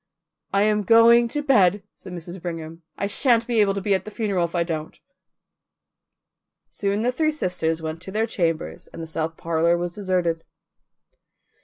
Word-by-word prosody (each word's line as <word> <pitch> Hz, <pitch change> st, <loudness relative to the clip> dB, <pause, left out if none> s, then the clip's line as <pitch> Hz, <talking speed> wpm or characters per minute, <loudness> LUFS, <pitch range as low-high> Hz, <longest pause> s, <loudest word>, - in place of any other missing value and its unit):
"I 200 Hz, +1 st, +3 dB
am 210 Hz, 0 st, +2 dB
going 230 Hz, +2 st, +6 dB
to 295 Hz, +5 st, -3 dB
bed," 205 Hz, -8 st, +3 dB
said 185 Hz, -, -12 dB
Mrs. 175 Hz, +1 st, -8 dB
Brigham. 165 Hz, -1 st, -6 dB, 0.2 s
"I -, -, -1 dB
sha'n't 230 Hz, +2 st, +2 dB
be 230 Hz, -2 st, +2 dB
able 195 Hz, -1 st, +2 dB
to 200 Hz, -, -2 dB
be 200 Hz, +1 st, +1 dB
at 190 Hz, -1 st, +1 dB
the 215 Hz, -, -8 dB
funeral 205 Hz, -5 st, -1 dB
if 170 Hz, -, -7 dB
I 170 Hz, -, +2 dB
don't." 160 Hz, -2 st, -5 dB, 1.7 s
Soon 200 Hz, +1 st, -1 dB
the 245 Hz, -, +2 dB
three 310 Hz, +4 st, +1 dB
sisters 165 Hz, -, -2 dB
went 160 Hz, +1 st, -5 dB
to 190 Hz, -, -8 dB
their 220 Hz, +3 st, 0 dB
chambers 170 Hz, -7 st, -2 dB
and 165 Hz, -, -9 dB
the -, -, -5 dB
south 160 Hz, 0 st, -3 dB
parlour 170 Hz, +1 st, +1 dB
was 175 Hz, 0 st, -3 dB
deserted. 180 Hz, -4 st, -1 dB
185 Hz, 175 wpm, -23 LUFS, 165-215 Hz, 1.7 s, going